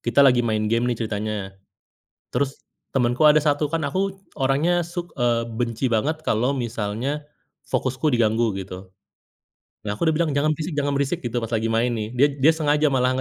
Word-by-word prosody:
kita 120 +4 +4
lagi 125 -2 +5
main 110 -2 0
game 115 +3 +1
nih 120 - 0
ceritanya, 105 -2 -3 0.8
terus 140 -1 -2 0.3
temenku 125 +4 +4
ada 150 - +6
satu, 145 0 +1
kan 160 -1 -2
aku 190 +6 -1 0.2
orangnya 150 +7 +2
suk 175 +1 -6
eee, 120 -1 +2
benci 115 +2 -2
banget 145 +9 +1
kalau 125 +5 +1
misalnya 120 +4 -2 0.5
fokusku 130 +4 0
diganggu 115 -4 +2
gitu. 95 0 -7 1.0
Nah, 105 - -1
aku 160 +10 +1
udah - - +2
bilang, 165 -3 +1
"Jangan 145 +2 +2
berisik 160 +1 -4
jangan 145 -1 0
berisik," 140 +5 -1
gitu, 120 0 -3
pas 115 0 -3
lagi 115 0 0
main 115 +2 +1
nih. 110 -2 -3
Dia 145 +3 +6
dia 160 +4 +7
sengaja 150 0 +2
malah 130 -1 +2
125 Hz, 175 wpm, -23 LUFS, 115-150 Hz, 1.0 s, dia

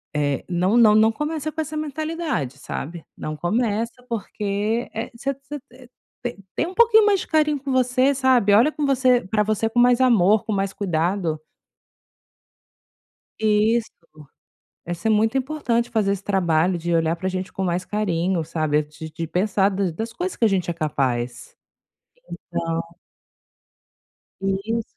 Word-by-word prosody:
eh, 145 -2 0
não 185 +6 +2
não 215 -3 +6
não 220 +1 +5
começa 300 +4 -3
com 315 - -3
essa 310 0 -5
mentalidade, 310 - -3
sabe. 165 +5 -6
Não 155 0 -5
começa, 225 +6 0 0.2
porque, 215 +1 -2
eh, 225 - -4
você 275 +4 -2
você, 275 +2 -9
eh, 255 -1 -15 0.4
te 245 - -4 0.2
tem 330 - 0
um 370 - -7
pouquinho 445 -1 +6
mais 400 -2 +3
de - - -8
carinho 300 -2 +2
com 275 0 -4
você, 255 +2 +3
sabe. 255 -6 +3
Olha 245 +8 +5
com 300 -1 -2
você 255 -2 +3
pra 210 +1 +1
você 215 +1 0
com 240 - 0
mais 245 0 +5
amor, 215 -5 +4
com 215 - -2
mais 195 0 -1
cuidado. 170 -3 -1 2.0
Isso. 220 +2 +2 1.0
Essa 175 +4 -3
é 220 - +4
muito 220 +4 +2
importante, 250 -4 -1
fazer 210 -3 +1
esse 200 -1 -3
trabalho 175 -3 +1
de 170 +1 -2
olhar 165 0 +2
pra 185 +2 -3
gente 185 0 -4
com 195 - -3
mais 180 0 -1
carinho, 185 -4 0
sabe, 155 -2 0
de 150 +1 -10
de 165 0 -5
pensar 195 +3 +1
das 190 -3 -1
das 225 +7 -4
coisas 360 +7 -3
que 230 - +2
a - - +6
gente 185 -3 0
é - - -4
capaz. 125 -6 -2 1.0
Então 165 0 -1 1.6
Isso. 195 +4 -1
210 Hz, 160 wpm, -22 LUFS, 175-250 Hz, 2.0 s, não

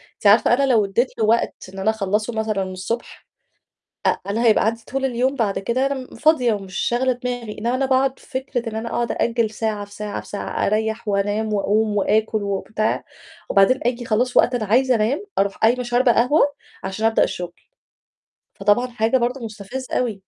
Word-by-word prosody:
أنتِ 205 - 0
عارفة 220 +3 +6
أنا 275 - +3
لو 225 -5 +4
ادّيت 215 +6 +1
له 220 - +3
وقت 230 +2 +2 0.2
إن 195 - -7
أنا 190 +3 +1
أخلّصه 215 +2 -1
مثلًا 220 -3 -1
الصبح، 185 +5 -5 0.8
أ - - +3
أنا 230 +3 +1
هيبقى 215 -1 +4
عندي 230 +1 -1
طول 270 0 -1
اليوم 260 +1 +1
بعد 205 -5 0
كده 240 +7 0
أنا 280 - 0
م 260 -2 -8
فاضية 250 -3 +3
ومش 195 -2 -7
شاغلة 255 +2 +1
دماغي، 245 -3 -5
إنّما 235 +3 -1
أنا 270 +1 +1
باقعُد 265 0 +1
في - - -19
فكرة 245 -3 -4
إن 220 - -6
أنا 225 +1 -3
أقعُد 240 0 -1
أأجِّل 230 -2 0
ساعة، 215 -2 -3
في 205 - -17
ساعة، 210 0 -4
في - - -15
ساعة، 205 - -3
أريّح 220 +1 -1
وأنام 205 +2 0
وأقوم 210 +1 +1
وآكُل 215 +2 +1
وبتاع 200 +2 -1 0.5
وبعدين 200 +7 +4
آجي 245 0 -1
خلاص 240 +3 0
وقت 250 - +4
أنا 220 - -2
عايزة 255 +5 +3
أنام، 240 - 0
أروح 195 0 +1
قايمة 240 +3 +2
شاربة 240 0 +3
قهوة 250 +8 +3 0.4
عشان 195 +4 -1
أبدأ 225 - +3
الشُغل، 175 -1 -5 1.0
فطبعًا 205 +5 +2
حاجة 235 +1 +1
برضه 245 +2 -1
مُستفزّة 225 +4 -6
أوي. 240 -4 0
225 Hz, 190 wpm, -21 LUFS, 210-245 Hz, 1.0 s, عارفة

